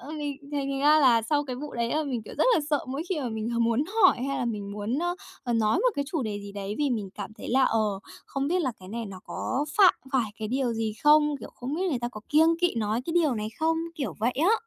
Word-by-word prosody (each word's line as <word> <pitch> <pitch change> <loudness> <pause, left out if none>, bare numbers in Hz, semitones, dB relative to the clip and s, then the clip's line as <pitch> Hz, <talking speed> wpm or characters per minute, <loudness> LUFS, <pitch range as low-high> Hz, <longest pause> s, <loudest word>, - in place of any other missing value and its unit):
ờ, 270 +5 -10
mình 290 -2 -4 0.2
thành 275 -1 -1
ra 300 +2 +6
là 235 -5 +5
sau 290 +5 +1
cái 255 -2 -5
vụ 295 +2 -7
đấy 235 0 -1
là 310 +1 +1
mình, 250 -5 -3
kiểu, - - -9
rất - - +4
là - - +3
sợ 295 - +1
mỗi 275 +4 -3
khi 340 -6 -1
mà 250 - -2
mình 220 0 -3
h 235 - -1
muốn 230 +5 +2 0.2
hỏi 370 - +7
hay 275 -1 -1
là 250 - -1
mình 205 -3 -3
muốn, 210 +6 -2 0.5
ờ, 240 - -1
nói 220 -1 +2
một - - +3
cái 285 - 0
chủ 315 -6 0
đề 205 -2 -3
gì 200 0 -9
đấy. 200 0 -4
Vì 290 -2 +1
mình 210 -5 -2
cảm 205 0 -6
thấy - - -7
là, 265 +2 +3
ờ, 215 -3 +1 0.3
không 275 +1 -2
biết 360 +2 +2
là 260 -4 0
cái 185 - -11
này 230 +1 -4
nó 190 -2 -9
có 275 +3 -2
phạm 380 -3 +8 0.2
phải 235 -5 +1
cái 215 -1 -3
điều 255 -1 0
gì 220 -1 -1
không, 295 -1 +5
kiểu - - -9
không 260 +4 -4
biết 360 - -1
người 255 - 0
ta 240 - -1
có 215 -3 -9
kiêng 325 +2 +4
kỵ 355 -6 +2
nói 220 0 0
cái 330 - -2
điều 310 -7 +3
này 215 0 -3
không? 325 +1 +2 0.2
Kiểu 285 -5 -3
vậy 240 +3 +2
á. 395 +6 +5
255 Hz, 280 wpm, -27 LUFS, 220-295 Hz, 0.5 s, phạm